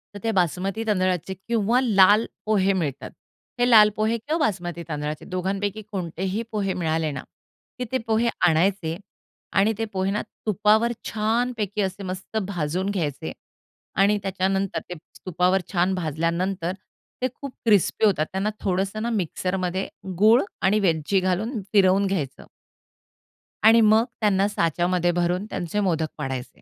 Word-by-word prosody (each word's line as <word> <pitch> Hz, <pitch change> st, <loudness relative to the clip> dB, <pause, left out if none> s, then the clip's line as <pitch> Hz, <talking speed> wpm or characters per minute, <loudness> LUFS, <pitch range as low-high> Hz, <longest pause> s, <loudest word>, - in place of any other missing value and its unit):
तर -, -, -6 dB
ते 225 Hz, -, +1 dB
बासमती 190 Hz, +3 st, 0 dB
तांदळाचे 185 Hz, -3 st, 0 dB
किंवा 230 Hz, +1 st, +2 dB
लाल 210 Hz, -2 st, +5 dB, 0.2 s
पोहे 200 Hz, -2 st, +2 dB
मिळतात. 150 Hz, -8 st, -3 dB, 0.5 s
हे 245 Hz, 0 st, +3 dB
लाल 215 Hz, -3 st, +8 dB
पोहे 220 Hz, +2 st, +1 dB
किंवा 295 Hz, +8 st, -2 dB
बासमती 175 Hz, -, -3 dB
तांदळाचे 150 Hz, 0 st, -4 dB
दोघांपैकी 195 Hz, +3 st, -2 dB
कोणतेही 190 Hz, +3 st, -3 dB
पोहे 200 Hz, -3 st, -1 dB
मिळाले 160 Hz, -2 st, -1 dB
ना, 135 Hz, -3 st, -6 dB, 0.6 s
की 250 Hz, -, -2 dB
ते 260 Hz, -, +2 dB
पोहे 225 Hz, +1 st, +2 dB, 0.2 s
आणायचे 170 Hz, 0 st, +1 dB, 0.5 s
आणि 205 Hz, +3 st, +3 dB
ते 225 Hz, -, -1 dB
पोहे 190 Hz, 0 st, 0 dB
ना 210 Hz, -, -1 dB, 0.2 s
तुपावर 215 Hz, +3 st, +3 dB, 0.2 s
छानपैकी 220 Hz, -1 st, -1 dB
असे 195 Hz, +1 st, -3 dB
मस्त 185 Hz, +3 st, -5 dB
भाजून 180 Hz, +1 st, -2 dB
घ्यायचे 155 Hz, -8 st, -3 dB, 0.7 s
आणि 205 Hz, +2 st, +4 dB
त्याच्यानंतर 195 Hz, 0 st, -1 dB
ते -, -, -4 dB, 0.3 s
तुपावर 185 Hz, +1 st, +2 dB
छान 180 Hz, +1 st, +2 dB
भाजल्यानंतर 170 Hz, +2 st, -1 dB, 0.5 s
ते 255 Hz, -, +2 dB
खूप 280 Hz, -2 st, -7 dB
क्रिस्पी 215 Hz, 0 st, +3 dB
होतात 180 Hz, -7 st, +2 dB
त्यांना 195 Hz, +2 st, -1 dB
थोडंसं 195 Hz, +3 st, -1 dB
ना 235 Hz, -, -1 dB
मिक्सरमध्ये 185 Hz, -2 st, -2 dB, 0.3 s
गूळ 220 Hz, +6 st, +6 dB, 0.2 s
आणि 205 Hz, +3 st, +3 dB
वेलची 175 Hz, 0 st, +1 dB
घालून 200 Hz, +6 st, -1 dB
फिरवून 195 Hz, -1 st, +4 dB
घ्यायचं. 170 Hz, -9 st, -3 dB, 1.2 s
आणि 230 Hz, +1 st, +7 dB
मग 220 Hz, +1 st, +5 dB, 0.2 s
त्यांना 200 Hz, -2 st, +3 dB
साच्यामध्ये 175 Hz, -1 st, +1 dB
भरून 175 Hz, +2 st, 0 dB
त्यांचे 175 Hz, +4 st, -3 dB
मोदक 165 Hz, -6 st, +1 dB
पाडायचे. 135 Hz, -3 st, -5 dB
190 Hz, 140 wpm, -24 LUFS, 175-215 Hz, 1.2 s, लाल